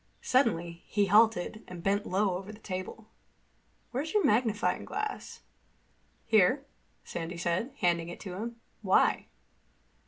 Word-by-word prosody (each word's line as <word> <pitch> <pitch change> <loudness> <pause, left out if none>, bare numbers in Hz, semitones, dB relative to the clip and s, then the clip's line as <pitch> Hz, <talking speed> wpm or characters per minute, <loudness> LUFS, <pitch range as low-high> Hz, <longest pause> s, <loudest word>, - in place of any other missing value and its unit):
Suddenly 175 -10 +1
he 205 -1 +2
halted 215 0 +3
and 175 -2 -9
bent 200 +2 +1
low 190 0 +1
over 195 +3 -6
the 210 - -11
table. 190 +1 -6 0.9
"Where's 290 - -3
your 415 - +4
magnifying 220 -1 +2
glass?" 425 0 -5 0.8
"Here," 225 +6 +4 0.4
Sandy 170 +1 -5
said, 175 +9 -1
handing 170 -1 +2
it 175 - -8
to 190 -4 -6
him. 230 +5 -5 0.3
"Why?" 190 -3 +3
205 Hz, 125 wpm, -30 LUFS, 180-225 Hz, 0.9 s, your